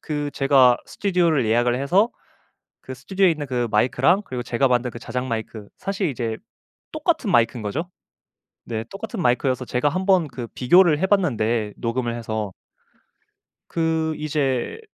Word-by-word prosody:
그 145 Hz, -1 st, -3 dB
제가 135 Hz, -3 st, +5 dB
스튜디오를 170 Hz, -, +1 dB
예약을 120 Hz, +3 st, +2 dB
해서 190 Hz, +11 st, +3 dB, 0.7 s
그 130 Hz, -, -8 dB
스튜디오에 185 Hz, +8 st, +1 dB
있는 150 Hz, -3 st, -3 dB
그 125 Hz, -2 st, -1 dB
마이크랑 130 Hz, -, +3 dB
그리고 125 Hz, -1 st, -5 dB
제가 125 Hz, +2 st, +1 dB
만든 125 Hz, 0 st, +1 dB
그 120 Hz, -, -9 dB
자작 125 Hz, +1 st, -4 dB
마이크 110 Hz, -3 st, -5 dB
사실 195 Hz, -1 st, -2 dB
이제 115 Hz, -4 st, -3 dB, 0.6 s
똑같은 310 Hz, -, 0 dB
마이크인 115 Hz, -4 st, +2 dB
거죠. 160 Hz, -, -4 dB, 0.7 s
네. 110 Hz, -1 st, -4 dB
똑같은 210 Hz, +1 st, -6 dB
마이크여서 125 Hz, 0 st, +1 dB
제가 125 Hz, +4 st, 0 dB
한번 185 Hz, 0 st, +2 dB
그 125 Hz, -2 st, -7 dB
비교를 160 Hz, +4 st, +4 dB
해 190 Hz, -, +2 dB
봤는데 120 Hz, -, +1 dB
녹음을 120 Hz, 0 st, -2 dB
해서 110 Hz, -4 st, -4 dB, 1.2 s
그 160 Hz, -1 st, 0 dB
이제 145 Hz, -, -1 dB
130 Hz, 325 characters per minute, -22 LUFS, 120-175 Hz, 1.2 s, 제가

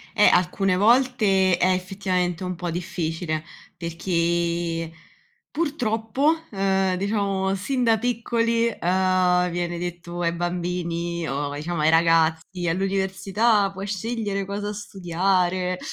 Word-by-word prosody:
Eh, 210 Hz, -, +6 dB
alcune 185 Hz, +1 st, +2 dB
volte 210 Hz, -4 st, +3 dB
è 185 Hz, +1 st, +3 dB
effettivamente 185 Hz, -1 st, -2 dB
un 185 Hz, 0 st, -2 dB
po' 175 Hz, 0 st, -4 dB
difficile, 165 Hz, -2 st, -3 dB, 0.3 s
perché 170 Hz, -1 st, -1 dB, 0.6 s
purtroppo, 280 Hz, -1 st, 0 dB
uhm, 195 Hz, -1 st, +1 dB
diciamo, 195 Hz, -1 st, 0 dB
sin 250 Hz, +6 st, -1 dB
da 225 Hz, -2 st, +4 dB
piccoli, 230 Hz, 0 st, 0 dB
uhm, 180 Hz, 0 st, +2 dB
viene 175 Hz, 0 st, -3 dB
detto 175 Hz, 0 st, -5 dB
ai 170 Hz, -1 st, +1 dB
bambini 170 Hz, -1 st, -2 dB
o, 145 Hz, +1 st, -2 dB
diciamo, 155 Hz, +2 st, -3 dB
ai 155 Hz, -, +4 dB
ragazzi: 165 Hz, +2 st, +2 dB
“All'università 195 Hz, +3 st, +1 dB
puoi 195 Hz, +1 st, -6 dB
scegliere 205 Hz, -1 st, -2 dB
cosa 205 Hz, +1 st, -4 dB
studiare.” 185 Hz, -2 st, -1 dB
185 Hz, 110 wpm, -24 LUFS, 170-200 Hz, 0.6 s, Eh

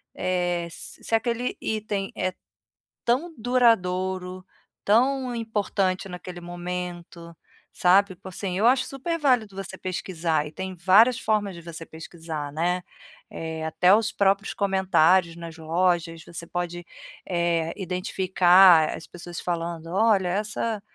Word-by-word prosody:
eh, 175 Hz, -2 st, -1 dB
se -, -, -8 dB
se -, -, -6 dB
aquele 235 Hz, +2 st, -1 dB
item 210 Hz, -2 st, -3 dB
é 185 Hz, -, -1 dB, 0.7 s
tão 285 Hz, +9 st, +1 dB
duradouro, 185 Hz, -6 st, +1 dB, 0.4 s
tão 255 Hz, +3 st, +2 dB
importante 200 Hz, -4 st, -1 dB
naquele 180 Hz, 0 st, -8 dB
momento, 175 Hz, -1 st, -6 dB, 0.4 s
sabe, 185 Hz, +1 st, +3 dB
tipo 180 Hz, -, -13 dB
assim, 185 Hz, 0 st, -4 dB
eu 215 Hz, -, +2 dB
acho 255 Hz, +1 st, +4 dB
super 330 Hz, +5 st, -3 dB
válido 245 Hz, -9 st, +2 dB
você 195 Hz, -1 st, -7 dB
pesquisar 175 Hz, -5 st, -2 dB
e -, -, -10 dB
tem 190 Hz, +3 st, -6 dB
várias 200 Hz, +8 st, +5 dB
formas 210 Hz, -3 st, 0 dB
de 170 Hz, -, -10 dB
você 165 Hz, -1 st, -8 dB
pesquisar, 160 Hz, -2 st, -7 dB
né. 175 Hz, +4 st, 0 dB, 0.5 s
Eh, 160 Hz, -1 st, -5 dB
até 180 Hz, +4 st, +4 dB
os 220 Hz, 0 st, 0 dB
próprios 200 Hz, +1 st, +1 dB
comentários 190 Hz, -3 st, +3 dB
nas 170 Hz, -1 st, -9 dB
lojas, 165 Hz, 0 st, 0 dB
você 170 Hz, 0 st, -8 dB
pode, 175 Hz, 0 st, -4 dB, 0.4 s
eh, 170 Hz, -2 st, 0 dB
identificar 180 Hz, -2 st, +4 dB
as 165 Hz, -, -9 dB
pessoas 175 Hz, 0 st, -8 dB
falando, 170 Hz, -1 st, -3 dB
olha, 200 Hz, -3 st, +3 dB
essa 210 Hz, +2 st, -2 dB
185 Hz, 130 wpm, -25 LUFS, 170-205 Hz, 0.7 s, várias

